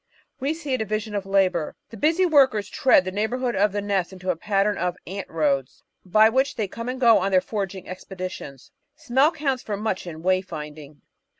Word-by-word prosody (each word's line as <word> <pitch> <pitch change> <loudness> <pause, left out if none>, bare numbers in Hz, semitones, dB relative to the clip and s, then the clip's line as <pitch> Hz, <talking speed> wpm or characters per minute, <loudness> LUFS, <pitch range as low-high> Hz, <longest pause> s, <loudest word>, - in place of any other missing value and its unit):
We 280 +4 -1
see 295 -5 -4
a 255 - 0
division 215 0 -3
of 200 -1 -3
labour. 185 -5 +1 0.2
The - - -8
busy 325 - +3
workers 265 - +4
tread 230 -7 +4
the 185 - -3
neighbourhood 240 +4 -1
of 205 +1 +3
the 205 0 -3
nest 195 -3 -1
into 185 -1 -3
a - - -3
pattern 200 +3 +1
of 180 -1 -2
"ant 195 +3 -6
roads" 140 -5 -1 0.2
by 215 +4 +5
which 260 +5 +1
they 215 -3 -1
come 230 +5 -6
and 255 +1 -4
go 235 -3 +6
on 195 - 0
their 190 -1 +4
foraging 190 -1 -5
expeditions. 185 -7 -8 0.2
Smell 270 +3 +2
counts 280 -6 -1
for 205 -2 -4
much 200 -3 -3
in 160 -1 -8
way 185 0 +3
finding. 150 -4 -9
200 Hz, 200 wpm, -24 LUFS, 185-240 Hz, 0.2 s, go